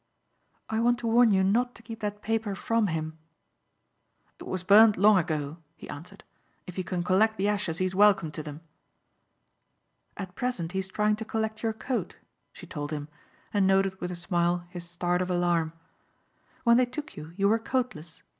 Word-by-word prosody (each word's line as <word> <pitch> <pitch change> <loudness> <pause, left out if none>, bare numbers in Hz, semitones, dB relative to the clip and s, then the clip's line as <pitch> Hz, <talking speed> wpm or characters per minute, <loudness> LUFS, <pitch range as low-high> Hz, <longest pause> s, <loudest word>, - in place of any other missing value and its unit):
"I 220 - -1
want 240 +1 +3
to 235 - -2
warn 235 +1 +5
you 190 -2 +3
not 240 +6 +1
to - - -14
keep 225 -1 -8
that 210 -1 -4
paper 225 -2 -1
from 225 +1 +1
him." 160 -1 -4 1.2
"It - - -9
was 185 -1 -3
burned 210 +3 +7
long 205 0 +6
ago," 155 -3 -3 0.2
he - - -11
answered. 175 +7 -10 0.4
"If 180 - -9
he 185 - -2
can 180 -1 -2
collect 215 +5 +3
the 195 - +1
ashes 200 -5 -1
he 185 - +1
is 185 - -2
welcome 195 -5 +4
to 155 - -5
them." 150 0 -8 1.6
"At 190 -3 -6
present 185 -8 -2
he 190 - -2
is 190 - -3
trying 210 +2 +1
to 220 - -5
collect 220 -1 -3
your 225 -1 0
coat," 225 -3 -3 0.3
she - - -12
told 145 0 -5
him 150 -1 -4 0.4
and 200 -2 +3
noted 190 0 +2
with 180 - -2
a 180 - -4
smile 175 0 0
his 175 -1 -8
start 175 +1 0
of 185 - -2
alarm. 175 -2 +1 0.9
"When 235 -1 +5
they 250 -1 +3
took 290 +5 -7
you 155 +2 -9
you 200 0 +3
were 225 +2 +3
coatless. 225 - -3
190 Hz, 190 wpm, -28 LUFS, 175-220 Hz, 1.6 s, burned